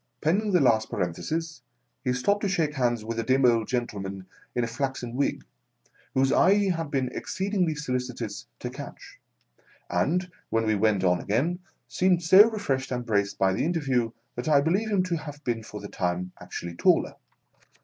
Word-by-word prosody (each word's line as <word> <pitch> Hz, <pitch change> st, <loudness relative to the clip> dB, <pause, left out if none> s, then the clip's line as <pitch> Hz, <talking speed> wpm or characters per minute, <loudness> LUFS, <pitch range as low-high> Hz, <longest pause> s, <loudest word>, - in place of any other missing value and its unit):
Pending 200 Hz, +7 st, +1 dB
the 180 Hz, -, +4 dB
last 110 Hz, -6 st, +3 dB
parenthesis, 160 Hz, -, -3 dB, 0.4 s
he 125 Hz, -, +1 dB
stopped 200 Hz, +12 st, +1 dB
to 200 Hz, -, 0 dB
shake 160 Hz, -6 st, 0 dB
hands 120 Hz, -5 st, 0 dB
with 115 Hz, 0 st, -3 dB
a -, -, 0 dB
dim 130 Hz, +2 st, +3 dB
old 115 Hz, -2 st, +3 dB
gentleman 100 Hz, -6 st, -3 dB, 0.3 s
in 120 Hz, -, +1 dB
a -, -, 0 dB
flaxen 125 Hz, -1 st, -3 dB
wig, 140 Hz, +3 st, -1 dB, 0.7 s
whose 135 Hz, 0 st, +3 dB
eye 195 Hz, +2 st, +5 dB
he 205 Hz, -1 st, +2 dB
had 165 Hz, -4 st, -1 dB
been 135 Hz, -3 st, 0 dB
exceed 195 Hz, +2 st, -4 dB
ingly 175 Hz, -6 st, +1 dB
solicitous 125 Hz, -6 st, -4 dB
to -, -, -5 dB
catch, -, -, -10 dB, 0.7 s
and, 175 Hz, -, 0 dB, 0.2 s
when 115 Hz, 0 st, +1 dB
we 110 Hz, -, +2 dB
went 105 Hz, -2 st, +2 dB
on 90 Hz, -1 st, +3 dB
again, 155 Hz, -, 0 dB, 0.3 s
seemed 175 Hz, +8 st, +2 dB
so 190 Hz, +6 st, +8 dB
refreshed 135 Hz, -, -2 dB
and 125 Hz, -1 st, -2 dB
braced 100 Hz, -2 st, 0 dB
by 95 Hz, -1 st, +3 dB
the -, -, 0 dB
interview 135 Hz, -8 st, +1 dB, 0.2 s
that 120 Hz, +5 st, -3 dB
I 145 Hz, -2 st, +6 dB
believe 185 Hz, +9 st, +1 dB
him 200 Hz, -3 st, +2 dB
to 180 Hz, -2 st, -1 dB
have 150 Hz, -1 st, -9 dB
been 115 Hz, -2 st, -1 dB
for 105 Hz, -1 st, -8 dB
the 100 Hz, -, -7 dB
time 90 Hz, -1 st, -2 dB
actually 85 Hz, 0 st, -6 dB
taller. -, -, +3 dB
130 Hz, 180 wpm, -27 LUFS, 110-165 Hz, 0.7 s, so